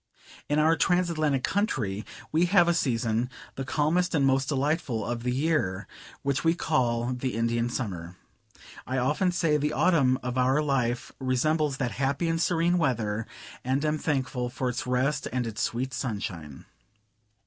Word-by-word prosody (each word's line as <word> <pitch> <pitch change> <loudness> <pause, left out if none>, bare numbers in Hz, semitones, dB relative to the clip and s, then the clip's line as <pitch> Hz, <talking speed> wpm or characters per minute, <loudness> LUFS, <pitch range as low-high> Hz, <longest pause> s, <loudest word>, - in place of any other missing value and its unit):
In 145 - +2
our 160 +2 +4
Transatlantic 165 -7 +1
country 110 - -1 0.3
we 165 +3 +3
have 175 -1 +4
a 170 - +4
season, 120 -5 0 0.2
the 135 - -4
calmest 160 +6 +1
and 140 -3 +3
most 135 0 +2
delightful 140 - 0
of 120 -1 -3
the 125 +1 -1
year, 125 - 0 0.4
which 140 -1 0
we 165 +1 +3
call 125 -7 0
the 125 0 -3
Indian 115 +1 0
summer: 90 -8 -4 0.7
I 130 - -1
often 150 +9 +1
say 165 -4 +2
the 150 +1 -1
autumn 140 -8 +3
of 125 0 -2
our 130 +3 +3
life 130 -5 0
resembles 140 +3 +1
that 125 -3 -1
happy 140 +5 +1
and 165 0 0
serene 175 +1 +2
weather, 115 -6 0 0.4
and 135 +4 0
am 155 0 0
thankful 130 -5 -1
for 125 +1 -2
its 125 +1 -4
rest 130 +3 0
and 125 -1 -1
its 110 -1 -4
sweet 130 +3 -2
sunshine. 100 - -5
135 Hz, 160 wpm, -27 LUFS, 120-155 Hz, 0.7 s, our